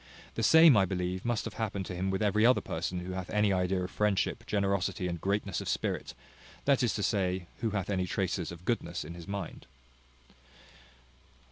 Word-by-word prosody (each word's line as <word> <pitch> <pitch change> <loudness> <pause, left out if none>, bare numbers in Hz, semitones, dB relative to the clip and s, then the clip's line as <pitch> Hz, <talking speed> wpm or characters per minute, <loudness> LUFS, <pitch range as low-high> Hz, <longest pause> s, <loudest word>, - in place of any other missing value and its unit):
The - - -3
same, 160 -4 +8
I 100 -2 +5
believe, 90 0 -2
must 120 -2 -1
have - - -5
happened 100 -4 -3
to 90 - -5
him 95 +2 -1
with 95 +2 0
every 105 +1 +2
other 125 +2 +6
person 90 +2 -3
who 90 +1 -6
hath 95 -1 -5
any 105 -1 +2
idea 90 0 0
of 90 - -5
friendship, 105 -2 0
generosity, 100 -1 0
and 85 -2 -4
greatness 100 -1 -1
of - - -4
spirit, - - -2 0.5
that 140 -2 +4
is 120 - +1
to 105 - -2
say, 95 -4 0
who 115 - 0
hath 100 -3 -2
any 95 -2 -1
traces 90 -2 -2
of 85 +1 -11
goodness 85 -8 -2
in 85 - -7
his 85 -1 -10
mind. 100 -9 -6
95 Hz, 195 wpm, -30 LUFS, 90-105 Hz, 0.5 s, same